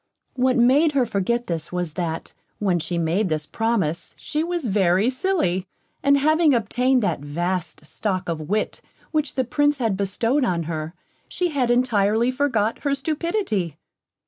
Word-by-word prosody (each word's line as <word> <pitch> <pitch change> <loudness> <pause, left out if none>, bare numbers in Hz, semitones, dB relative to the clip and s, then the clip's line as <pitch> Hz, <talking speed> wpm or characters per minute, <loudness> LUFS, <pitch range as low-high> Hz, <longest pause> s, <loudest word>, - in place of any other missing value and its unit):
What 255 0 +2
made 275 +6 +4
her 265 -3 +3
forget 235 +3 -1
this 165 -1 -3
was 175 -3 -3
that, 165 -2 -4 0.2
when 185 -4 +1
she 170 +2 -2
made 170 +5 +1
this 155 -1 -1
promise, 200 -6 -1
she 310 0 -2
was 345 -3 -2
very 195 +1 +2
silly, 255 - 0 0.3
and 280 0 +4
having 310 0 +4
obtained 250 +3 +1
that 200 - 0
vast 160 +2 -3
stock 185 +3 -3
of 155 -2 -4
wit 215 +1 -1 0.3
which 305 -3 -1
the 260 - +2
Prince 290 +4 +1
had 225 -7 0
bestowed 225 +8 0
on 175 -8 0
her, 160 +1 -5 0.3
she 360 -1 -1
had 270 -6 0
intirely 235 -1 +2
forgot 235 -6 0
her 280 -1 0
stupidity. 290 - -2
225 Hz, 155 wpm, -23 LUFS, 180-275 Hz, 0.3 s, made